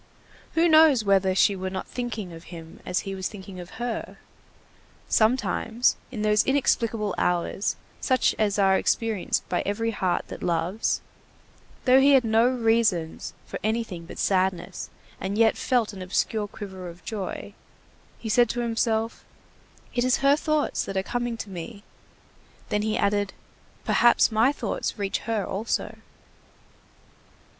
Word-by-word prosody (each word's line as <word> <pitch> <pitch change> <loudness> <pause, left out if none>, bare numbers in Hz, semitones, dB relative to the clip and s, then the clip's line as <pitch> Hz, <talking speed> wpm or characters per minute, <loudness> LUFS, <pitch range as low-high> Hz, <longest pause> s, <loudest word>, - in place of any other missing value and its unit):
Who 330 +1 +4
knows 310 -7 +6
whether 190 -1 +3
she 200 +1 +4
were 190 0 -3
not 185 0 -5
thinking 225 -7 -5
of 165 0 -11
him 165 -2 -11
as 180 - 0
he 195 - -5
was 190 -1 -3
thinking 190 -3 -10
of 175 0 -10
her? 240 -1 -4 0.9
Sometimes, 230 0 +2
in 220 -5 -4
those 210 0 +4
inexplicable 230 -6 +1
hours 180 +3 0 0.2
such 255 -2 +2
as 210 -2 +1
are 195 -1 +4
experienced 225 -5 0
by 180 - 0
every 225 +3 -1
heart 185 -4 -1
that - - -8
loves, 175 +5 0 0.8
though 260 0 +7
he 280 +1 +6
had 265 -2 +6
no 225 +1 +4
reasons 225 -9 +1
for - - -6
anything 215 -6 -2
but - - -9
sadness 190 -1 0 0.3
and 195 +2 -3
yet 225 -1 +4
felt 240 -5 0
an 190 - -8
obscure 205 +3 -1
quiver 190 -3 -8
of 170 +1 -14
joy, 205 -5 -5 0.6
he 225 - -7
said 240 +1 +4
to 240 - -2
himself: 225 -1 -1 0.7
"It 245 - +1
is 255 0 +3
her 280 +1 +6
thoughts 305 0 0
that 195 - -4
are 190 - +1
coming 240 +1 -2
to 220 - -6
me!" 185 +3 -8 0.9
Then 210 - +1
he 215 +1 0
added: 200 0 +1 0.5
"Perhaps 240 -1 +4
my 225 +5 +4
thoughts 290 - -3
reach 200 -2 -1
her 220 -3 0
also." 210 +4 -2
215 Hz, 150 wpm, -25 LUFS, 190-235 Hz, 0.9 s, though